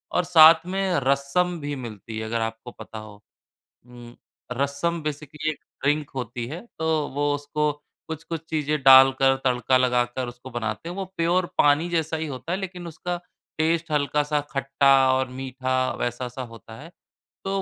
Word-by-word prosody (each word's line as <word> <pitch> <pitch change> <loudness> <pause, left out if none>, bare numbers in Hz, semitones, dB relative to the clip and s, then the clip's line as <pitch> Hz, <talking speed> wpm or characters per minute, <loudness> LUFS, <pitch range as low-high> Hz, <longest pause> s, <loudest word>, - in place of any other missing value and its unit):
और 180 - +3
साथ 165 -1 +7
में 190 -2 0
रसम 140 +6 +1
भी 145 -1 -4
मिलती 115 -3 -8
है, 110 - -3
अगर 115 +1 -2
आपको 115 +2 -5
पता 110 0 -9
हो। 105 -1 -12 0.7
हुँ, 120 -1 -13 0.4
रसम 140 +6 -1
बेसिकली 150 +1 -3
एक 155 - -7 0.2
ड्रिंक 150 +1 +1
होती 125 -2 -4
है, 155 +8 -6 0.2
तो 160 -2 0
वो 145 0 +1
उसको 150 +1 -1 0.4
कुछ-कुछ 160 +1 -5
चीजें 150 -1 0
डालकर, 135 0 +7
तड़का 125 0 +2
लगाकर 125 0 +1
उसको 125 +2 -10
बनाते 110 +4 -4
हैं। 175 - -5
वो 195 - -3
प्योर 175 +2 +2
पानी 145 +3 +4
जैसा 160 -1 0
ही 160 0 -3
होता 145 +4 -6
है, 185 - 0
लेकिन 180 -2 -6
उसका 175 +2 -4 0.4
टेस्ट 165 +1 +1
हल्का-सा 150 0 +1
खट्टा 135 0 +3 0.2
और 130 0 0
मीठा, 130 0 -1
वैसा-सा 125 +1 -3
होता 110 0 -12
है। 165 +3 -11 0.5
तो 195 0 -1
140 Hz, 160 wpm, -24 LUFS, 125-160 Hz, 0.7 s, साथ